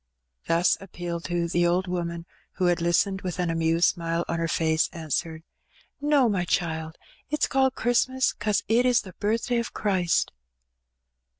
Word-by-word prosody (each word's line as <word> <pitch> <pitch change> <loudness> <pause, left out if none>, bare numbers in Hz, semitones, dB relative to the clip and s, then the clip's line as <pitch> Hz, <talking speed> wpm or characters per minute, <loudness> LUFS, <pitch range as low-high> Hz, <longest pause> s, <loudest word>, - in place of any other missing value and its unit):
Thus 170 +2 +3
appealed 175 -3 -6
to, 175 -1 -1
the 175 0 +2
old 180 +2 +1
woman, 170 -2 -3 0.3
who 185 - -1
had 175 -1 +2
listened 190 +3 +1
with 180 -2 -4
an 175 -2 0
amused 165 +1 +2
smile 170 -1 -2
on 165 - -2
her 165 - 0
face, 160 0 +1
answered 160 0 -3 0.3
— - - -32
"No, 290 -3 +4
my 195 -5 0
child. 160 -2 -2 0.3
It's 300 0 +1
called 265 -1 +1
Christmas 260 +2 +1
'cause 210 -1 -1
it 230 +3 +3
is 250 -1 +4
the 185 - -11
birthday 230 +4 0
of 235 - -5
Christ." 185 -5 +1
175 Hz, 165 wpm, -26 LUFS, 165-210 Hz, 0.3 s, No